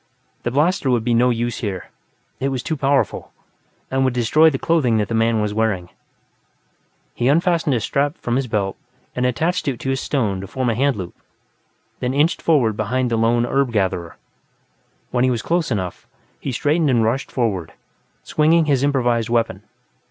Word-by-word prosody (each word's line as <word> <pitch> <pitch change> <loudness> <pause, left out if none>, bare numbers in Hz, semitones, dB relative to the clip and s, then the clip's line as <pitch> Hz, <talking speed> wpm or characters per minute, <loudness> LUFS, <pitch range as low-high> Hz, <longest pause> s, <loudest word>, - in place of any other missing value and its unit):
The - - -2
blaster 150 +3 +1
would 120 -3 +2
be 120 0 +1
no 120 +2 +4
use 120 0 -1
here; 100 -6 -5 0.5
it 135 - 0
was 130 -2 -3
too 160 - -2
powerful, 140 -1 0 0.6
and 135 0 +1
would 130 -2 +1
destroy 150 +7 +4
the 135 - -2
clothing 135 -8 +2
that 105 -2 -1
the - - -2
man 115 0 +2
was 105 -1 -1
wearing. 105 -5 -1 1.2
He 120 - -1
unfastened 165 -1 +2
a - - +1
strap 140 +7 -1
from 120 - -2
his 135 0 0
belt 100 -4 -1 0.4
and 125 0 +1
attached 160 +9 -1
it 130 -4 -1
to 135 - -1
a - - +1
stone 110 -8 -1
to 100 - -7
form 125 +3 -1
a - - -2
hand 135 +2 +2
loop, 90 -4 -6 0.9
then, 125 +2 -2
inched 155 +4 +2
forward 130 -10 +2
behind 120 +4 -1
the - - +2
lone 115 +1 +2
herb 135 0 +1
gatherer. 95 -5 -1 0.9
When 125 0 +1
he 130 - +3
was 120 -3 -1
close 170 -1 0
enough, 95 -7 -4 0.3
he 135 - -4
straightened 150 +5 +1
and 120 -3 +3
rushed 120 +5 -1
forward, 95 -10 -2 0.5
swinging 160 +2 +3
his 140 -3 +1
improvised 120 -5 +1
weapon. 115 -1 0
125 Hz, 180 wpm, -20 LUFS, 115-140 Hz, 1.2 s, no